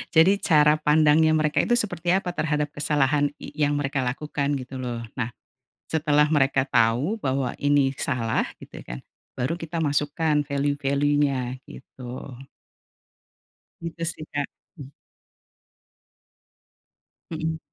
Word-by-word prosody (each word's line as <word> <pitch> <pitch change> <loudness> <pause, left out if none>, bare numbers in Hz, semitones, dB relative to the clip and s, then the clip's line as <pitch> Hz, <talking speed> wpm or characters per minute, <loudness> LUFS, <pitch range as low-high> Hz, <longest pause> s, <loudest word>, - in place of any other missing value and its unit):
jadi 170 +5 +6
cara 150 -2 +5
pandangnya 155 +1 +5
mereka 155 -1 +2
itu 240 - +2
seperti 175 -6 -1
apa 180 -1 0
terhadap 150 -2 0
kesalahan 145 0 +1
y - - -9
yang 145 0 +2
mereka 140 -1 -1
lakukan 140 +2 -2
gitu 130 +1 -8
loh 120 -2 -3 0.2
nah, 120 - -2 0.6
setelah 150 -2 +3
mereka 135 -2 +3
tahu 135 - +1
bahwa 130 -4 -1
ini 145 -2 +3
salah 115 -5 0
gitu - - -11
kan, - - -7 0.4
baru 130 +6 -1
kita 165 +1 -4
masukkan 150 +1 +1
value-value-nya 140 -2 0
gitu. 130 0 -9 1.5
Itu 165 0 -7
sih 155 - -9
Kak. 145 -1 0 2.9
Mhm. 160 0 -3
145 Hz, 110 wpm, -25 LUFS, 135-155 Hz, 2.9 s, jadi